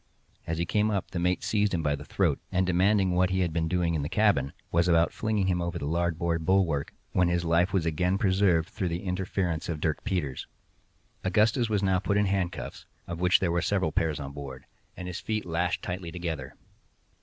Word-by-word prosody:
As 80 - -1
he 85 - 0
came 105 +4 +1
up, 100 -3 -2
the 90 - -2
mate 90 +1 0
seized 105 -3 +1
him 80 - -1
by 75 -1 +1
the 70 - -9
throat, - - 0
and 95 0 +2
demanding 95 +2 +3
what 90 +1 +3
he 95 0 +1
had 85 -3 0
been 80 0 0
doing 90 -1 +1
in 80 - 0
the 70 - -3
cabin, 100 -11 +2 0.2
was 85 +1 +3
about 85 -1 +3
flinging 110 -3 0
him 90 -2 +1
over 85 0 -2
the 75 - -4
larboard 85 +1 0
bulwark, 85 -5 +1 0.2
when 90 -1 +3
his 85 0 0
life 85 +3 +3
was 90 -4 +1
again 90 +4 +1
preserved 95 -5 +2
through 95 -5 -3
the 85 +1 -3
interference 90 -3 -2
of 80 -3 -2
Dirk 80 0 -1
Peters. 85 -11 -2 0.8
Augustus 110 +4 +2
was 105 -2 +1
now 95 -1 +3
put 100 +2 0
in 105 - +3
handcuffs 95 -3 -3 0.2
(of 85 -1 -6
which 90 0 +4
there 90 -3 0
were 85 0 +1
several 90 -2 +1
pairs 80 -1 0
on 70 -1 -6
board), 70 -2 -8 0.3
and 90 - -6
his 90 - -4
feet 110 -1 -2
lashed 85 +1 -1
tightly 90 -2 -4
together. 80 -7 -5
90 Hz, 215 wpm, -28 LUFS, 80-95 Hz, 0.8 s, which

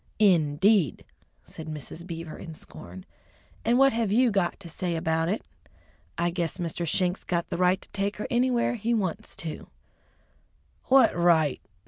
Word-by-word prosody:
"In 170 -9 +4
deed!" 190 - +2 0.4
said 160 - -9
Mrs. 155 +3 -7
Beaver 165 -2 -6
in 165 -3 -9
scorn. 90 - -11 0.6
"And 235 +2 +3
what 270 -1 +5
have 225 -3 0
you 240 +2 +4
got 195 -4 0
to 175 - -9
say 170 +1 -3
about 160 0 0
it? 210 - -1 0.7
I 170 +1 +1
guess 170 -1 -2
Mr. 170 -1 -3
Schenk's 180 +4 +1
got 170 -1 -2
the - - -1
right 185 +1 +3
to - - -13
take 200 +1 -2
her 210 - -4
anywhere 245 0 +2
he 235 +1 0
wants 190 -7 -2
to!" 160 -2 -6 1.2
"What 270 0 +5
right?" 170 -4 +3
175 Hz, 160 wpm, -27 LUFS, 165-210 Hz, 1.2 s, what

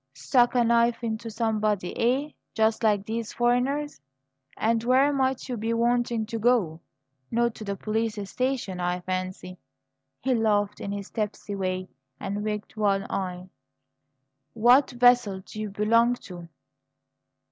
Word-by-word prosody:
Stuck 245 - +2
a 245 - +4
knife 235 +1 +2
into 225 0 -3
somebody, 215 -4 -1
eh? 265 +6 +1 0.2
Just 220 0 +2
like 210 -3 +2
these 225 0 -4
foreigners! 250 - 0 0.6
And 225 +1 +1
where 265 +4 +4
might 265 -1 0
you 250 -2 -3
be 225 +2 -1
wanting 235 -1 +1
to 225 +1 -5
go? 210 -9 +2 0.5
Not 235 0 +1
to 220 - -9
the 200 -1 -3
police 220 +2 -2
station, 250 -7 -2
I 180 0 -1
fancy?" 185 0 -5 0.6
He 265 - 0
laughed 210 -3 +1
in 200 - -4
his 200 -1 -6
tipsy 210 -2 -4
way, 185 -1 -2 0.3
and 200 +1 -3
winked 210 0 -4
one 200 -2 +1
eye. 185 -1 -4 1.0
"What 245 +5 +5
vessel 245 -5 +3
do 215 +3 -8
you 215 - -3
belong 230 +4 +3 0.2
to?" 175 -1 -9
220 Hz, 140 wpm, -26 LUFS, 200-240 Hz, 1.0 s, What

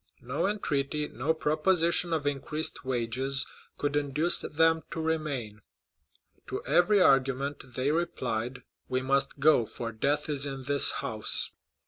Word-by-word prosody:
No 140 +9 -1
entreaty, 150 -7 -2
no 125 +8 -2
proposition 165 +2 +2
of 155 -3 -1
increased 145 +2 -1
wages, 130 +2 +1 0.3
could 145 0 -2
induce 145 +4 +3
them 160 +1 +2
to - - -6
remain; 145 -10 -3 0.9
to - - -5
every 200 +4 +3
argument 135 -4 +1
they 130 +3 0
replied, 125 -7 -3 0.3
"We 130 0 -1
must 135 +1 +1
go, 135 -6 +4
for 115 +1 -5
death 145 +7 -1
is 145 -2 0
in 135 -1 -6
this 140 +1 +3 0.2
house." - - +2
140 Hz, 130 wpm, -28 LUFS, 130-160 Hz, 0.9 s, go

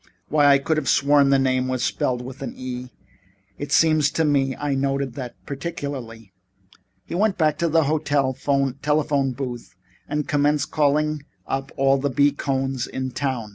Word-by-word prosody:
Why, 145 -1 +4
I 140 -1 +7
could 155 +3 -1
have 140 -5 -1
sworn 140 0 +4
that 135 - +5
name 130 -1 +1
was 130 -1 -1
spelled 125 -1 -1
with 130 +2 -9
an 135 - -5
E. 125 -1 -6 0.7
It 145 0 -5
seems 155 -3 +4
to 160 - +1
me 135 -3 +1
I 145 -1 -2
noted 135 -1 -1
that 125 -2 -7
particularly." 135 - -6 0.7
He - - -8
went 200 +2 +1
back 155 -3 +1
to 170 - +1
the 160 +1 +3
hotel 145 -2 +1
telephone 140 +1 0
booth 120 -5 -6 0.3
and 150 0 -2
commenced 145 -2 +1
calling 150 0 +1 0.2
up 135 0 -3
all 135 0 +3
the 145 +1 0
B. 140 +3 +3
Cohns 135 -2 -2
in 130 0 -4
town. 125 -4 -3
140 Hz, 170 wpm, -23 LUFS, 130-150 Hz, 0.7 s, I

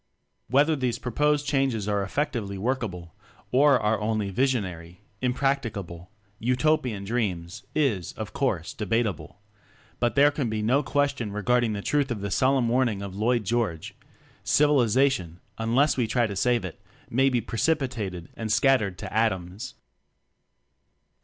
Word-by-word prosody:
\Vhether 145 +4 +4
these 125 -2 0
proposed 145 +4 0
changes 135 -7 0
are 105 -1 +1
effectively 110 -2 -2
workable 95 - -3 0.4
or 140 0 +5
are 110 +1 +1
only 105 -2 -1
"visionary," 95 -8 -1 0.2
"impracticable," 120 -10 -2 0.3
"Utopian 125 -3 +1
dreams," 95 -6 -2
is, 115 - 0
of 110 -3 -7
course, 105 - -1
debatable; 105 -3 -2 0.6
but 120 -1 +1
there 145 +1 +6
can 140 -5 -2
be 110 -1 -2
no 130 +6 +3
question 140 -5 -1
regarding 115 +2 +1
the 100 -1 -4
truth 145 -2 +1
of 115 -5 -3
the 100 0 -3
solemn 130 +1 +2
warning 115 -4 +1
of 95 -1 -7
Lloyd 115 +3 +1
George: 105 -6 -2 0.5
"Civilization, 130 - +2 0.2
unless 125 +7 +2
we 120 -3 +1
try 120 +2 +2
to 100 -3 -4
save 120 0 +1
it, 90 - -8 0.3
may 135 +3 +2
be 125 -2 +1
precipitated 115 - -2
and 110 -1 -4
scattered 110 -6 +3
to - - -7
atoms." 105 +1 -1
115 Hz, 135 wpm, -26 LUFS, 100-135 Hz, 0.6 s, there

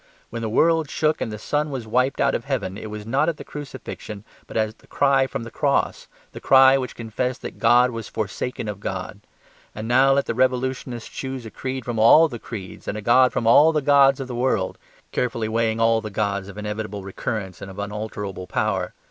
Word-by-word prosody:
When 115 - -4
the 110 - -2
world 160 +5 +3
shook 155 0 0
and 110 - -2
the 105 - -5
sun 150 +7 -1
was 130 -5 -5
wiped 125 +4 +1
out - - +3
of - - -2
heaven, 95 - -2
it 110 +1 -7
was 105 0 -7
not 135 +8 +1
at 165 - -3
the - - -8
crucifixion, 130 -7 -8 0.2
but - - -5
at 110 0 -1
the - - -22
cry 135 -1 +2
from 120 - -5
the 115 - -9
cross: 140 +3 0 0.2
the - - -9
cry 135 0 +7
which 130 -2 -3
confessed 125 +3 -3
that - - -7
God 125 +1 +5
was 115 -1 -6
forsaken 110 +2 -4
of 105 -1 -5
God. 95 0 -5 0.6
And 110 +1 -5
now 130 +3 +5
let 140 0 +1
the - - -2
revolutionists 125 -1 -1
choose 130 -3 -6
a 110 - -8
creed 130 -2 -5
from 120 -2 -3
all 155 +9 +7
the 120 -6 -7
creeds 100 -6 -8
and 105 - -3
a - - -5
god 125 +3 +5
from 115 - -2
all 145 +8 +7
the 155 - +1
gods 140 -1 +5
of 135 - -4
the 125 - -6
world, 120 -6 0 0.3
carefully 115 -3 -1
weighing 115 0 0
all 115 0 +3
the 110 - -6
gods 100 -1 -2
of 100 0 -10
inevitable 105 -1 -5
recurrence 95 -1 -5
and 100 - -7
of 95 - -11
unalterable 105 -2 -5
power. - - -1
115 Hz, 215 wpm, -23 LUFS, 105-130 Hz, 0.6 s, cry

